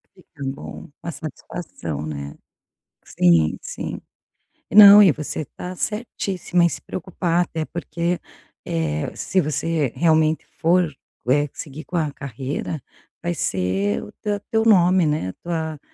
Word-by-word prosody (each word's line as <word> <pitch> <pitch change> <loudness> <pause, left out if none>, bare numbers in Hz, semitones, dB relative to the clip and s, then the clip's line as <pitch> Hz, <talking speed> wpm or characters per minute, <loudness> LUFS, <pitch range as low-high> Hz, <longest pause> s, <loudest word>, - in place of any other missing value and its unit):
Fica 165 -6 -15
bom. 135 +1 -7
Uma 170 - -4
satisfação, 130 - -6
né. 70 -2 -6 0.7
Sim, 85 -3 +3
sim. - - -5 0.7
Não, 205 0 +11
e 195 -5 +7
você 150 +1 -4
tá 180 +1 -6
certíssima 195 -4 -1
em - - +4
se - - -6
preocupar 175 -1 -1
até 160 -1 -4
porque, 170 +1 -2 0.5
eh, 75 -2 -2
se 190 - 0
você 155 -3 0
realmente 160 -1 +3
for, 170 -1 +3 0.4
eh, 145 +3 +3
seguir 150 +2 -8
com 180 - -7
a 155 -4 +1
carreira, 140 +3 -5 0.4
vai 175 0 0
ser 95 - 0
o - - -10
te 210 -1 -3
teu 220 0 +2
nome, 185 -4 +5
né, 150 -11 0
tua, 160 -3 -3
160 Hz, 130 wpm, -22 LUFS, 135-180 Hz, 0.7 s, Não